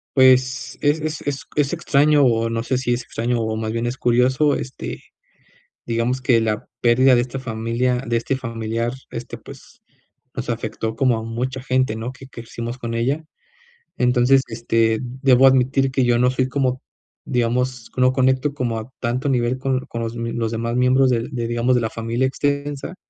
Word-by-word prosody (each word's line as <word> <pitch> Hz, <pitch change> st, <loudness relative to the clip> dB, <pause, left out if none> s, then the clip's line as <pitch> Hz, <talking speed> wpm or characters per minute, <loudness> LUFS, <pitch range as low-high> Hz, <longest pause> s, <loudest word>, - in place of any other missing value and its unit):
Pues, 130 Hz, -2 st, +3 dB
es 145 Hz, +2 st, +2 dB
es 155 Hz, 0 st, -4 dB
es 140 Hz, -1 st, -3 dB
es 145 Hz, -2 st, +1 dB
extraño, 150 Hz, -3 st, +3 dB
o 115 Hz, -2 st, +2 dB
no 115 Hz, 0 st, -2 dB
sé, 130 Hz, +1 st, 0 dB
si 125 Hz, -1 st, -1 dB
es 120 Hz, -, -2 dB
extraño, 115 Hz, +1 st, -2 dB
o 110 Hz, -1 st, -1 dB
más 110 Hz, 0 st, -3 dB
bien, 115 Hz, +1 st, -2 dB
es 120 Hz, +2 st, -3 dB
curioso, 130 Hz, +5 st, +3 dB
este, 130 Hz, -, -6 dB, 0.8 s
digamos, 120 Hz, +2 st, -1 dB
que 120 Hz, -2 st, +4 dB
la 110 Hz, -1 st, -1 dB
pérdida 130 Hz, +2 st, +5 dB
de 120 Hz, -, +4 dB
esta 125 Hz, +2 st, -4 dB
familia 120 Hz, +1 st, -1 dB
de 115 Hz, -, 0 dB
este 115 Hz, +4 st, -1 dB
familiar, 115 Hz, -1 st, -3 dB, 0.2 s
este, -, -, -6 dB
pues, -, -, -14 dB, 0.5 s
nos -, -, -4 dB
afectó 110 Hz, 0 st, -3 dB
como 130 Hz, -4 st, +2 dB
a 110 Hz, -, -5 dB
mucha 125 Hz, +3 st, -4 dB
gente, 130 Hz, -3 st, +1 dB
¿no?, 115 Hz, +3 st, -4 dB
que 135 Hz, +1 st, -13 dB
crecimos 120 Hz, 0 st, -7 dB
con 115 Hz, -2 st, -5 dB
ella. 135 Hz, +7 st, 0 dB, 0.8 s
Entonces, 125 Hz, +2 st, +4 dB
este, 115 Hz, -1 st, +1 dB
debo 130 Hz, +1 st, +3 dB
admitir, 135 Hz, +1 st, +3 dB
que 130 Hz, -1 st, +1 dB
yo 120 Hz, -1 st, +3 dB
no 125 Hz, +1 st, +3 dB
soy, 130 Hz, 0 st, 0 dB
como 130 Hz, -1 st, 0 dB, 0.5 s
digamos, 125 Hz, 0 st, -1 dB
no 130 Hz, 0 st, +4 dB
conecto 130 Hz, +2 st, +2 dB
como 120 Hz, -5 st, -2 dB
a 110 Hz, +3 st, -8 dB
tanto 125 Hz, +4 st, -1 dB
nivel, 125 Hz, -1 st, +1 dB
con 130 Hz, 0 st, 0 dB
con 115 Hz, -2 st, -7 dB
los 115 Hz, 0 st, -4 dB
m 115 Hz, 0 st, -3 dB
los 115 Hz, -1 st, -2 dB
demás 115 Hz, +1 st, -2 dB
miembros, 130 Hz, +1 st, +4 dB
de 120 Hz, -1 st, 0 dB
de 120 Hz, -4 st, -3 dB
digamos, 120 Hz, +2 st, +1 dB
de 120 Hz, -, +2 dB
la 110 Hz, -, -1 dB
familia 115 Hz, +3 st, -1 dB
extensa. 140 Hz, +3 st, -2 dB
125 Hz, 185 wpm, -21 LUFS, 115-130 Hz, 0.8 s, pérdida